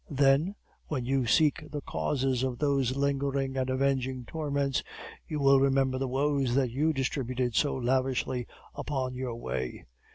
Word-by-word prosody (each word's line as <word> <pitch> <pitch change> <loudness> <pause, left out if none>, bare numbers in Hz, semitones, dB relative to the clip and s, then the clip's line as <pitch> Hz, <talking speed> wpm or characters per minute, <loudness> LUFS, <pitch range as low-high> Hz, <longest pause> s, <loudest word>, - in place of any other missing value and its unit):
Then, 140 +6 +3 0.3
when 130 -6 -2
you 130 -1 +1
seek 150 +5 +3
the 145 0 -4
causes 130 - -1
of 130 -2 -1
those 135 -3 +1
lingering 140 -1 0
and 130 -1 -1
avenging 130 -1 0
torments, 140 -2 -1 0.5
you 150 - -3
will 135 -1 +6
remember 135 -1 +2
the 135 - -1
woes 135 -1 +1
that 130 -3 +2
you 150 +6 +2
distributed 130 -3 -1
so 145 +5 +2
lavishly 130 -1 0 0.3
upon 135 -3 -3
your 125 -2 -4
way. 65 - -4
135 Hz, 150 wpm, -29 LUFS, 130-140 Hz, 0.5 s, will